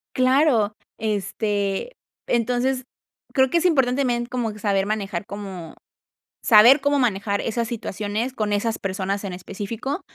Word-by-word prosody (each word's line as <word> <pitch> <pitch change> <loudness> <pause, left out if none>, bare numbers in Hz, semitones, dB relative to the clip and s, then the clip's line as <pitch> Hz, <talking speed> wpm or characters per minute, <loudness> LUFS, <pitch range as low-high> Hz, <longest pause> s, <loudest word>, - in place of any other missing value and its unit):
Claro, 255 -4 +3 0.3
este, 205 - -2 0.3
entonces, 250 +2 0 0.5
creo 265 -1 +4
que 340 - +2
es 340 - -1
importante 270 -6 +3
también 240 -2 0
como 240 -3 -2
que 210 - -11
saber 200 -2 +1
manejar, 200 -3 -3
como 190 -6 -8 0.7
saber 240 +5 +7
cómo 285 +1 +2
manejar 200 -4 0
esas 230 0 -2
situaciones 220 +1 -3
con 215 -4 -2
esas 220 +2 0
personas 195 +1 -2
en 195 - -4
específico, 210 - -5
220 Hz, 135 wpm, -23 LUFS, 200-255 Hz, 0.7 s, saber